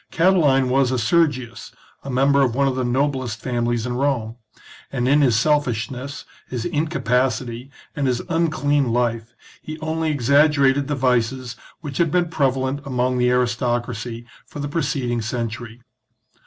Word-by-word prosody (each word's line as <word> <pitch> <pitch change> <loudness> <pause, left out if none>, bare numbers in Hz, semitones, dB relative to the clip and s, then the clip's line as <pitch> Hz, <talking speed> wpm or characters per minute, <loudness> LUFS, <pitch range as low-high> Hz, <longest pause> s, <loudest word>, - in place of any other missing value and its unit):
Catiline 155 -8 +3
was 135 0 +3
a 130 - 0
Sergius, 125 -1 0 0.3
a 140 - -8
member 135 +2 +3
of 125 -3 +1
one 140 +1 +2
of 130 - 0
the 130 - -1
noblest 130 -2 -1
families 120 -2 -1
in 125 - -2
Rome; 125 -4 -1 0.6
and 125 -2 -1
in 145 +3 +4
his 125 -6 +3
selfishness, 130 -1 -1 0.2
his 120 -2 -4
incapacity, 130 -5 -1 0.3
and 145 -3 0
his 125 -2 0
unclean 145 -6 +1
life, 115 -1 -1 0.3
he 155 0 -7
only 160 0 -1
exaggerated 140 0 +3
the 145 - -1
vices 125 -1 0 0.3
which 145 -5 -6
had 170 -2 +3
been 175 +1 +1
prevalent 135 -3 0
among 125 -2 -1
the 125 0 +3
aristoc 120 -1 0
racy 120 0 -6 0.2
for - - -12
the 145 - -3
preceding 135 -6 -1
century. 115 +1 -5
130 Hz, 150 wpm, -21 LUFS, 120-145 Hz, 0.6 s, in